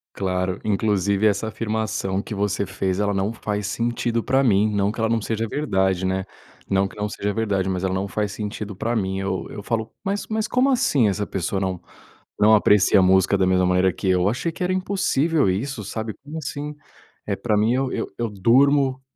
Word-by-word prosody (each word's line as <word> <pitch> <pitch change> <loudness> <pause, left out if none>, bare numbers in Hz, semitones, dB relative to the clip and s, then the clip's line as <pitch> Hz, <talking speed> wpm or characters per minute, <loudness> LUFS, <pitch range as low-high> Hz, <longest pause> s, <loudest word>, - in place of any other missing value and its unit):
Claro. 95 -1 -1
Inclusive 100 -1 +1
essa 105 +1 +2
afirmação 110 -3 -2
que 105 - -7
você 100 0 -1
fez, 95 0 -2
ela 105 -1 0
não 100 +3 -1
faz 105 -2 -3
sentido 115 +2 -1
pra 135 +1 +2
mim. 105 -3 +3
Não 100 0 +1
que 110 - -9
ela 115 0 +1
não 115 0 +2
seja 110 +1 -2
verdade, 95 -9 0
né. 95 0 0 0.5
Não 95 0 +2
que - - -14
não 105 0 -3
seja 105 0 -3
verdade, 100 -4 0
mas 95 -1 -2
ela 95 -1 0
não 95 +1 -2
faz 105 +2 -2
sentido 105 0 -5
pra 115 +5 -2
mim. 95 -3 -1
Eu 95 -1 -3
eu 105 - -8
falo, 115 +1 -2
mas, 200 +1 -2
mas 220 0 -1
como 255 +2 +2
assim, 150 - +3
essa 100 +1 -1
pessoa 95 0 -2
não, 95 -2 -2 0.6
não 110 +1 +6
aprecia 105 -1 +5
música 95 +1 +4
da 95 - +3
mesma 95 0 +3
maneira 90 +1 +3
que 95 - -6
eu. 90 0 +3
Achei 130 +10 -2
que - - -7
era 180 +1 +1
impossível 170 - +1
isso, 110 +6 -2
sabe, 110 +2 -4
como 145 +3 -8
assim? 150 0 -5 0.5
Eh, - - 0
pra 110 -3 -1
mim, 110 +3 +3
eu 130 +1 0
eu, - - -2
eu 120 -1 -1
durmo, 130 +6 +3
105 Hz, 205 wpm, -23 LUFS, 95-120 Hz, 0.6 s, não